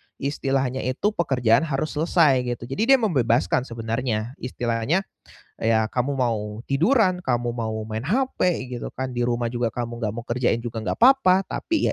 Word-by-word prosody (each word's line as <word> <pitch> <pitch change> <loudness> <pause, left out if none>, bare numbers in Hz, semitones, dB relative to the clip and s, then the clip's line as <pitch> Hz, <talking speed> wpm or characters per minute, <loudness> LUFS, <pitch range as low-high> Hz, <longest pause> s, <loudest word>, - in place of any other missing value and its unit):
istilahnya 135 -2 -1
itu 165 +11 0
pekerjaan 130 - +2
harus 150 +1 -2
selesai, 155 -3 +3
gitu, 120 -1 -3
jadi 215 - +3
dia - - +3
membebaskan 130 - +1
sebenarnya, 115 0 -2
istilahnya 120 +7 -1 0.6
"Ya 110 0 +2
kamu 130 +3 -1
mau 110 -3 -2
tiduran, 185 - +2
kamu 120 -6 -1
mau 110 -2 -3
main 110 0 -4
HP, 185 - 0
gitu 120 - -4
kan, 130 0 -3
di 120 - -3
rumah 120 -1 -1
juga 120 -1 0
kamu 120 0 -5
nggak 110 -3 -1
mau 120 - -6
kerjain 120 -1 +1
juga 115 -1 -4
nggak 110 - -2
papa," 230 -7 +5
tapi, 325 - -1
125 Hz, 160 wpm, -23 LUFS, 115-155 Hz, 0.6 s, papa